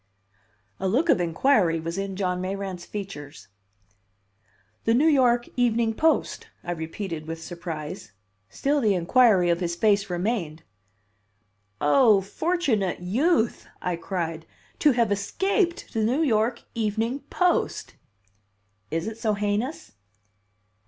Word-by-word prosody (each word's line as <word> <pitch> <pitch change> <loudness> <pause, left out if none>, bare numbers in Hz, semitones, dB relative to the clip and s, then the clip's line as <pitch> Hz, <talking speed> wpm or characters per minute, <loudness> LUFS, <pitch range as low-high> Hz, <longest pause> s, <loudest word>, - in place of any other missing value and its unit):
A 190 - -1
look 270 - +1
of 180 - +4
inquiry 170 0 +2
was 165 +1 -4
in 195 0 -3
John 180 -2 -1
Mayrant's 190 -1 -4
features. 165 - -8 1.4
"The 225 - +3
New 280 +6 +3
York 250 -6 +4
Evening 235 -2 +2
Post," 320 +7 +1 0.2
I 175 - -4
repeated 165 0 -5
with 165 0 -5
surprise. 160 - -7 0.4
Still 285 +1 0
the 210 -4 +3
inquiry 185 -1 +4
of 170 - 0
his 170 -2 -2
face 200 +1 +2
remained. 175 -4 -2 1.2
"Oh, 215 - +5
fortunate 225 - -1
youth!" 235 - +1
I 180 -1 -2
cried. 165 -2 -4 0.3
"To 295 -3 +5
have 235 -3 +1
escaped 355 - 0
the 225 - 0
New 255 +9 +2
York 235 -3 +1
Evening 225 +3 -1
Post!" 360 -1 0 1.0
"Is 165 +1 -2
it 220 0 -6
so 215 -3 +1
heinous?" 210 +8 -2
205 Hz, 120 wpm, -25 LUFS, 175-245 Hz, 1.4 s, Oh